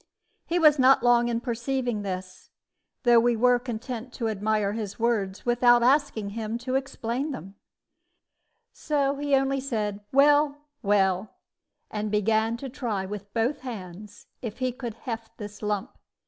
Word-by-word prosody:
He 340 - 0
was 305 -4 +5
not 260 -1 +5
long 240 -1 +4
in 235 -1 -1
perceiving 245 -2 -2
this, 185 -2 -6 0.5
though 240 -2 +6
we 240 +1 +3
were 245 +2 +4
content 240 0 -6
to 230 -3 -2
admire 210 -1 0
his 210 -3 -5
words 215 -5 -1
without 240 0 +4
asking 255 -6 +2
him 220 +1 -3
to 250 +2 -5
explain 265 0 -2
them; 195 - -7 1.2
so 285 -2 0
he 285 -1 +1
only 270 0 +1
said, 215 -6 -2
"Well, 290 +1 +4 0.2
well," 195 -2 +1 0.6
and 210 0 -2
began 220 +2 +1
to 270 - -6
try 235 -7 -3
with 205 0 -7
both 230 +6 +1
hands 205 -5 -9 0.2
if 230 -3 -6
he 255 -1 0
could 240 -3 -6
heft 230 -2 -7
this 210 -1 -8
lump. 210 -2 -2
235 Hz, 145 wpm, -26 LUFS, 210-260 Hz, 1.2 s, though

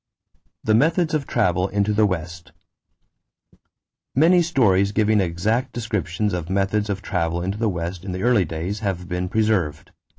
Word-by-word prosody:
=The 110 - +2
Methods 160 +7 +2
of 150 -4 -1
Travel 90 -5 +1
into 100 +1 0
the 105 0 +3
West.= 85 -2 -5 1.6
Many 170 +6 +5
stories 100 - +2
giving 110 -1 +3
exact 110 +9 -1
descriptions 105 -4 -2
of 85 -1 -4
methods 100 +2 0
of 100 0 -3
travel 85 -2 -1
into 95 +3 -3
the 115 -2 +1
West 85 0 -4
in 95 - -5
the 95 +2 -4
early 120 -5 +4
days 85 +6 -4
have 95 -4 -3
been 90 +1 -3
preserved. 95 -9 0
100 Hz, 155 wpm, -22 LUFS, 90-110 Hz, 1.6 s, Many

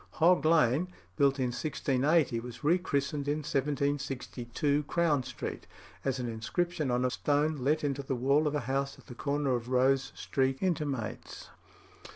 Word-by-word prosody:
Hog 175 +1 +4
Lane, 155 0 +4 0.3
built 140 +4 +3
in 130 -2 0
1680, 140 0 +1
was 120 +4 -9
rechristened 145 -4 +1
in 150 +1 -1
1762 140 -1 -1
Crown 165 -5 +2
Street, - - -6 0.4
as 135 -1 0
an 125 -1 -3
inscription 150 +7 -2
on 125 +1 +1
a 125 - +1
stone 150 +3 +1
let 145 +4 +1
into 140 -1 -1
the 135 -1 -2
wall 140 +5 +2
of 150 - -1
a 145 - 0
house 135 +3 -2
at - - -18
the 125 - -9
corner 140 +2 -1
of 120 0 -2
Rose 130 +1 +2
Street 135 0 0
intimates. 145 - -3
140 Hz, 155 wpm, -30 LUFS, 130-150 Hz, 0.4 s, Hog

